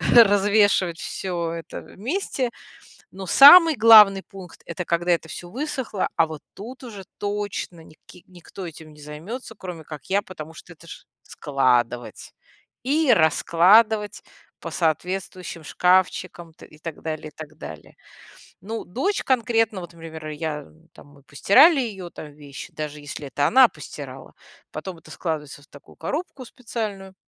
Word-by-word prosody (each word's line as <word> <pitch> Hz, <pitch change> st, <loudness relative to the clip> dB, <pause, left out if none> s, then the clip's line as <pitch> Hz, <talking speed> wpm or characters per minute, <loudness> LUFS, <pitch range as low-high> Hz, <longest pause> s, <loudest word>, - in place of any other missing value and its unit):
развешивать 205 Hz, -5 st, +4 dB
всё 170 Hz, -3 st, -4 dB
это 165 Hz, -1 st, -7 dB
вместе, 255 Hz, -, -4 dB, 0.6 s
но 190 Hz, 0 st, -8 dB
самый 320 Hz, -, +9 dB
главный 210 Hz, -4 st, +7 dB
пункт- 190 Hz, -4 st, -13 dB
это, 170 Hz, +1 st, -5 dB
когда 175 Hz, +1 st, 0 dB
это 170 Hz, -, 0 dB
всё 175 Hz, -, -8 dB
высохло, 260 Hz, -, -3 dB
а 165 Hz, -, +4 dB
вот 155 Hz, -2 st, -8 dB
тут 245 Hz, +6 st, -10 dB
уже 210 Hz, -6 st, -9 dB
точно 205 Hz, -4 st, -4 dB
ник 155 Hz, 0 st, -19 dB, 0.3 s
никто 180 Hz, +1 st, -11 dB
этим 160 Hz, -2 st, -11 dB
не 150 Hz, -, -16 dB
займется, 175 Hz, -, -8 dB
кроме 180 Hz, -5 st, -8 dB
как 150 Hz, -2 st, -10 dB
я, 200 Hz, +2 st, +1 dB
потому 165 Hz, -5 st, -10 dB
что 175 Hz, -, -14 dB
это 170 Hz, 0 st, -19 dB
ж -, -, -11 dB, 0.2 s
складывать 125 Hz, -4 st, -1 dB, 0.5 s
и 290 Hz, +2 st, +2 dB
раскладывать 205 Hz, +5 st, +3 dB, 0.4 s
по -, -, -7 dB
соответствующим 180 Hz, +1 st, -3 dB
шкафчикам 180 Hz, 0 st, 0 dB
т -, -, -15 dB
и 155 Hz, -, -18 dB
так 160 Hz, -1 st, -8 dB
далее, 155 Hz, -1 st, -5 dB
так 155 Hz, -1 st, -11 dB
далее. 80 Hz, -, -11 dB, 0.7 s
Ну, 220 Hz, +5 st, -6 dB
дочь 315 Hz, -, -2 dB
конкретно, 225 Hz, -5 st, +1 dB
вот 175 Hz, -1 st, -9 dB
пример 160 Hz, -2 st, -9 dB
я 150 Hz, -1 st, -5 dB, 0.3 s
там -, -, -16 dB
мы 145 Hz, -1 st, -20 dB
постирали 270 Hz, -, +5 dB
ее 195 Hz, -8 st, -5 dB
там 150 Hz, -3 st, -10 dB
вещи, 145 Hz, -1 st, -11 dB
даже 150 Hz, -1 st, -6 dB
если 145 Hz, 0 st, -8 dB
это 145 Hz, +2 st, 0 dB
она 260 Hz, +1 st, +7 dB
постирала, -, -, -10 dB, 0.4 s
потом 185 Hz, -3 st, -7 dB
это -, -, -17 dB
складывается 150 Hz, -4 st, -5 dB
в -, -, -20 dB
такую 145 Hz, -, -17 dB
коробку 295 Hz, -4 st, -5 dB
специальную, 215 Hz, -6 st, -6 dB
180 Hz, 145 wpm, -23 LUFS, 155-220 Hz, 0.7 s, самый